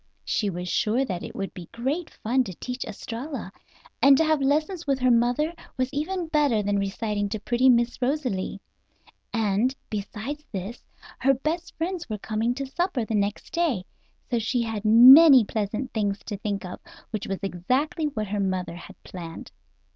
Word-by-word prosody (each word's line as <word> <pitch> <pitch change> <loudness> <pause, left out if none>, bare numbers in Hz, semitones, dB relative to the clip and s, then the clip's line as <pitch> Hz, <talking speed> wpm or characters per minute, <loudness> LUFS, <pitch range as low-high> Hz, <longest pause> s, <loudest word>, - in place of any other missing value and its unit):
She 210 - 0
was 180 -1 -5
sure 225 +8 +1
that 180 -7 -4
it - - -8
would 195 0 -4
be 175 -2 -10
great 275 +9 -2
fun 255 +4 0
to 190 -4 -7
teach 250 +6 -5
Estralla, 230 +2 -6 0.5
and 275 -1 +7
to 320 - +4
have 310 -2 +2
lessons 310 +5 0
with 275 -1 +2
her 255 -1 +3
mother 245 +7 +2 0.2
was 255 +2 -1
even 340 +5 -2
better 290 -9 +2
than 200 0 +1
reciting 205 +1 -2
to 215 +1 -3
pretty 245 +4 +2
Miss 240 0 +2
Rosalie; 250 -9 -1 0.7
and, 225 +3 +1 0.2
beside 220 +8 -5
this, 200 +4 -5 0.4
her 270 +1 +3
best 330 +6 -3
friends 345 -2 -3
were 215 - -2
coming 220 +4 -1
to 275 +1 -3
supper 285 - -1
the 220 - -4
next 205 +6 -2
night, 295 - 0 0.5
so 240 - +2
she 235 +2 0
had 220 -2 -4
many 260 +5 +9
pleasant 215 +5 -3
things 205 -3 0
to 210 - -4
think 200 -1 -3
of, 180 - -7 0.3
which 215 -3 -4
was 195 - -2
exactly 255 - -1
what 270 -8 -2
her 205 0 -2
mother 185 -3 -1
had 195 +2 -11
planned. 165 -3 -9
235 Hz, 175 wpm, -25 LUFS, 205-275 Hz, 0.7 s, many